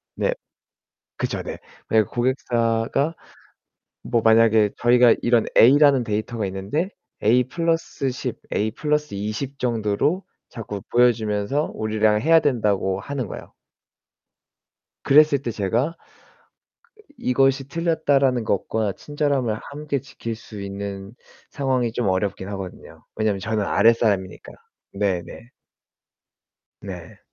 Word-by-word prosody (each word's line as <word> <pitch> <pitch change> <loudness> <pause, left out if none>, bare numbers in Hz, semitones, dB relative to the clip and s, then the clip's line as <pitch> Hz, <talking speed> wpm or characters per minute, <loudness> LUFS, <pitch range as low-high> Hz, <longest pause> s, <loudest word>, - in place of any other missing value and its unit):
네. - - 0 0.8
그쵸 - - -2
네. - - -6 0.3
그리고 110 -2 +2
고객사가 120 +3 0 0.9
뭐 120 -2 0
만약에 110 -1 +5
저희가 120 -1 +5
이런 120 -2 +3
A라는 140 0 +6
데이터가 110 0 -2
있는데 100 - -2 0.3
A+ 120 +4 +4 0.7
10, 125 -2 -5 0.2
A+ 110 +1 0 0.4
20 110 +8 -4
정도로 120 - 0 0.3
자꾸 105 -3 -7
보여주면서 120 +2 +1
우리랑 110 0 +1
해야 165 +1 +5
된다고 105 -8 0
하는 135 -4 -4
거예요. - - -9 1.5
그랬을 145 -1 +5
때 120 - -3
제가 115 - -1 1.2
'이것이 135 +1 +1
틀렸다.'라는 140 -7 +1
것과 105 0 -1
친절함을 140 -6 -1
함께 145 -1 -3
지킬 120 -4 -7
수 110 -2 -11
있는 100 +1 -6 0.4
상황이 130 -4 -1
좀 115 -4 -1
어렵긴 95 0 -1
하거든요. 95 -3 -8
왜냐면 110 -2 0
저는 110 -1 -1
아랫사람이니까. 105 -5 +1 0.4
네네. 100 +3 -3 1.3
네. 90 -4 -9
115 Hz, 235 characters per minute, -22 LUFS, 105-135 Hz, 1.5 s, A라는